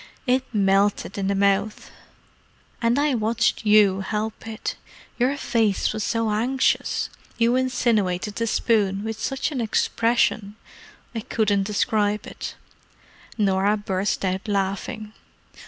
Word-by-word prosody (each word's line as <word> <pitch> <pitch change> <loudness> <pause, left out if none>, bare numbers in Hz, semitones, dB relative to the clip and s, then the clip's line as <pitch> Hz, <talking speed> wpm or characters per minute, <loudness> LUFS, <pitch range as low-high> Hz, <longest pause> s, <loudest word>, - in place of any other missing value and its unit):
"It 255 0 +2
melted 200 -1 +1
in 195 - -1
the 200 - +1
mouth. 200 +2 0 0.9
And 235 +2 +2
I 290 0 +2
watched 225 -1 0
you 205 -2 +5
help 215 +3 -4
it; 220 -1 -4 0.4
your 260 +4 +2
face 220 -8 +1
was 215 -1 -3
so 230 +1 0
anxious—you 235 0 0
insinuated 220 -7 0
the 230 - 0
spoon 205 -4 +1
with 220 0 -4
such 270 +6 -2
an 265 -5 -2
expression—I 225 -1 -1
couldn't 210 -4 0
describe 210 0 0
it——" - - -7 0.8
Norah 200 0 +2
burst 195 -1 -1
out 190 +3 -2
laughing. 205 +2 -2
215 Hz, 115 wpm, -23 LUFS, 200-230 Hz, 0.9 s, you